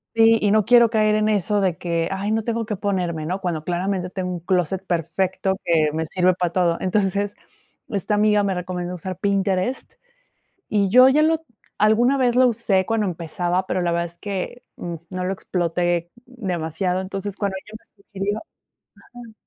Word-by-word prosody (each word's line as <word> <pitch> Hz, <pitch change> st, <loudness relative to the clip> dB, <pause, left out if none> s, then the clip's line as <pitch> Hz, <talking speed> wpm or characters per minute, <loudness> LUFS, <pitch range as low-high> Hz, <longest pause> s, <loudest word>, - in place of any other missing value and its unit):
Sí, 225 Hz, 0 st, +5 dB
y 205 Hz, -, +2 dB
no 215 Hz, -1 st, +3 dB
quiero 240 Hz, 0 st, +6 dB
caer 215 Hz, -1 st, +2 dB
en 215 Hz, 0 st, +2 dB
eso 205 Hz, 0 st, +1 dB
de 180 Hz, -4 st, 0 dB
que: 170 Hz, -1 st, -1 dB
"Ay, 195 Hz, +2 st, -2 dB
no 220 Hz, 0 st, 0 dB
tengo 230 Hz, 0 st, -2 dB
que 210 Hz, -, -3 dB
ponerme," 180 Hz, -6 st, -2 dB
¿no?, 185 Hz, +4 st, -2 dB
cuando, 175 Hz, -5 st, -3 dB
claramente, 180 Hz, +2 st, -2 dB
tengo 185 Hz, -1 st, -4 dB
un 175 Hz, -, -4 dB
clóset 185 Hz, +1 st, 0 dB
perfecto 185 Hz, +3 st, -1 dB
que 160 Hz, -3 st, +3 dB
me 160 Hz, +1 st, -1 dB
sirve 180 Hz, +3 st, +2 dB
para 175 Hz, -1 st, -1 dB
todo. 175 Hz, -2 st, +1 dB
Entonces, 200 Hz, +1 st, 0 dB, 0.5 s
esta 200 Hz, 0 st, -2 dB
amiga 210 Hz, 0 st, +3 dB
me 195 Hz, -1 st, 0 dB
recomendó 180 Hz, 0 st, -4 dB
usar 185 Hz, +1 st, -6 dB
Pinterest, 195 Hz, +3 st, -1 dB, 0.8 s
y 200 Hz, -2 st, +2 dB
yo, 255 Hz, +6 st, +7 dB
ya 295 Hz, +3 st, +4 dB
lo 320 Hz, +1 st, +2 dB, 0.3 s
alguna 230 Hz, +6 st, +4 dB
vez 245 Hz, -2 st, +2 dB
lo 255 Hz, 0 st, +5 dB
usé 210 Hz, -5 st, +1 dB
cuando 225 Hz, -2 st, 0 dB
empezaba, 175 Hz, +1 st, -2 dB
pero 185 Hz, -, -1 dB
la 175 Hz, -1 st, 0 dB
verdad 170 Hz, 0 st, 0 dB
es 170 Hz, 0 st, -14 dB
que, 205 Hz, +4 st, -5 dB
mm, 175 Hz, -1 st, -5 dB, 0.2 s
no 185 Hz, -1 st, -3 dB
lo 185 Hz, -, -1 dB
exploté 175 Hz, -2 st, -1 dB, 0.2 s
demasiado. 185 Hz, -6 st, -2 dB
Entonces, 195 Hz, +1 st, -5 dB
cuando 200 Hz, -2 st, -2 dB
ella 215 Hz, +1 st, -10 dB
me 205 Hz, -2 st, -27 dB
sugirió 200 Hz, +1 st, -3 dB, 0.8 s
ajá. 240 Hz, -2 st, -11 dB
190 Hz, 180 wpm, -22 LUFS, 180-215 Hz, 0.8 s, yo